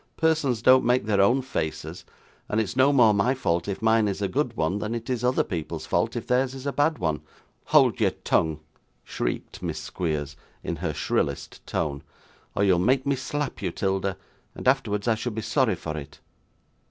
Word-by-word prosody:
'Persons 155 -8 +1
don't 130 0 +6
make 125 0 +2
their 100 -2 +2
own 125 +7 +3
faces, 80 -11 -4 0.4
and 105 - +1
it's 110 0 -2
no 130 +2 +5
more 120 -6 +5
my 115 +6 +2
fault 85 -9 -1
if 100 +2 -4
mine 110 -1 +4
is 100 - -2
a 100 - 0
good 125 -1 -1
one 80 +6 0
than 105 +3 -3
it 115 +2 -4
is 125 -2 -2
other 125 +1 +2
people's 85 -6 -5
fault - - 0
if - - -4
theirs 130 +1 +1
is 135 0 -8
a 140 - -1
bad 150 +2 +2
one.' 80 -3 -1 0.4
'Hold - - +4
your - - +4
tongue,' 80 -1 0 0.4
shrieked - - -4
Miss - - -3
Squeers, 75 -4 -3 0.3
in 85 - -3
her 80 0 -2
shrillest - - -2
tone; 70 -2 -2 0.5
'or 100 - +2
you'll 95 -3 +4
make 130 +7 +2
me 140 0 +2
slap 145 +2 -4
you, 95 - -1
'Tilda, 95 +1 -1 0.4
and - - -5
afterwards 115 -6 +1
I 115 - +4
should 110 0 -4
be 110 - -3
sorry 110 0 +2
for 80 -2 -5
it! 75 -2 -8
110 Hz, 195 wpm, -25 LUFS, 90-130 Hz, 0.5 s, don't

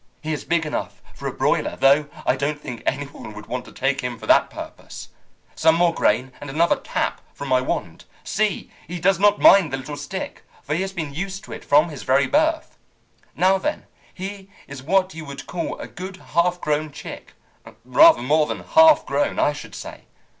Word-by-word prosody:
He 155 0 -2
is 150 - -4
big 170 -1 +1
enough 150 - -4
for - - -6
a - - -2
broiler, - - 0
though 140 +2 +4 0.2
I - - +3
don't 145 +2 -2
think 125 -6 -7
any 145 +2 0
one 125 -6 -11
would 105 0 -9
want 125 +1 -5
to - - -13
take 135 0 -1
him 125 -2 -4
for - - -10
that - - +4
purpose. - - -9 0.4
Some 160 0 +3
more 170 0 +3
grain, 125 +1 +1
and 145 - -7
another 165 +5 +2
tap - - -3
from 140 - -6
my 130 0 +3
wand. 90 -9 -4 0.2
See! 210 -2 -1 0.2
He 175 +2 -5
does 185 +1 +2
not 205 0 +4
mind 190 -7 +6
the 135 - -1
little 135 +3 -7
stick, 145 +7 -6 0.2
for 150 - -3
he 165 - 0
has 190 0 -3
been 160 -6 -5
used 195 +5 -5
to - - -12
it - - -8
from 150 +4 +4
his 145 -4 -8
very 135 +1 +3
birth. 315 - 0 0.6
Now, 190 +3 +3
then, 300 +10 -3 0.3
he 195 +1 -8 0.2
is 140 -2 -8
what 185 +6 +1
you 160 0 -7
would 140 -1 -8
call 170 -2 -4
a - - -7
good 185 +1 -8
half 175 +1 0
grown 150 -1 -1
chick. 145 - -10 0.5
Rather 320 - +6
more 150 +3 +3
than - - -4
half 320 -1 +6
grown, - - 0
I - - +2
should - - -10
say. - - -9
155 Hz, 205 wpm, -22 LUFS, 140-190 Hz, 0.6 s, mind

